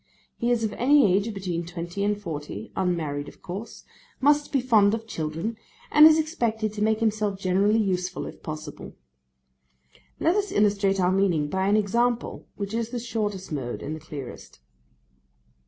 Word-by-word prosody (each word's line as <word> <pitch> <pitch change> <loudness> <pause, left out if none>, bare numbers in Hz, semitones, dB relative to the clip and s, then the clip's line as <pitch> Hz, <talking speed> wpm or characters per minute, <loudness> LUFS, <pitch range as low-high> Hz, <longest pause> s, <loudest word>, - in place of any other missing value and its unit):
He 235 - -1
is 240 -2 +2
of 215 - -1
any 265 -6 +4
age 200 +3 0
between 185 -4 -3
twenty 170 +3 -5
and 205 0 0
forty, 165 +3 -6
unmarried 155 -6 -1
of - - -14
course, 205 +6 -7 0.4
must 290 +2 +3
be 275 - +2
fond 220 -5 +4
of 225 0 -7
children, 165 +3 -4 0.3
and 300 +1 +9
is 315 0 +6
expected 235 -10 -1
to 210 - -5
make 220 0 +2
himself 215 -3 0
generally 195 +3 +2
useful 185 -4 -1
if - - -9
possible. 155 -1 -7 1.3
Let 335 +3 +3
us 410 -2 0
illustrate 200 -1 +2
our 180 0 +3
meaning 180 -6 +2
by 190 +4 0
an 205 +1 +4
example, 235 +3 0
which 200 0 -5
is 230 0 -1
the 245 - -4
shortest 210 -6 -3
mode 130 -5 -4
and 155 - -4
the - - -8
clearest. 145 -5 -9
205 Hz, 165 wpm, -25 LUFS, 180-225 Hz, 1.3 s, and